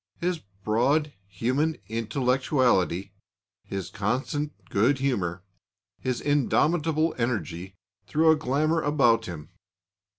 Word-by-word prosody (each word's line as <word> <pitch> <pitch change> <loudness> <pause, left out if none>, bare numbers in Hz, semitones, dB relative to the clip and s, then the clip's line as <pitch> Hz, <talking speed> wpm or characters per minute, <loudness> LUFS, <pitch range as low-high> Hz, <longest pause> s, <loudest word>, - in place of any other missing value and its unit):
His 175 -1 -1 0.2
broad 135 +9 +2
human 130 - 0
intellectuality, 120 - +1 0.5
his 95 -3 -5
constant 135 +8 -1 0.2
good 120 +8 +3
humour, 95 -10 -1 0.6
his 130 -2 -2
indomitable 155 +3 +2
energy, 95 -6 -2 0.3
threw 160 +1 +4
a - - +5
glamour 155 +3 +1
about 120 -7 +3
him. 80 -3 -7
130 Hz, 95 wpm, -26 LUFS, 105-150 Hz, 0.6 s, a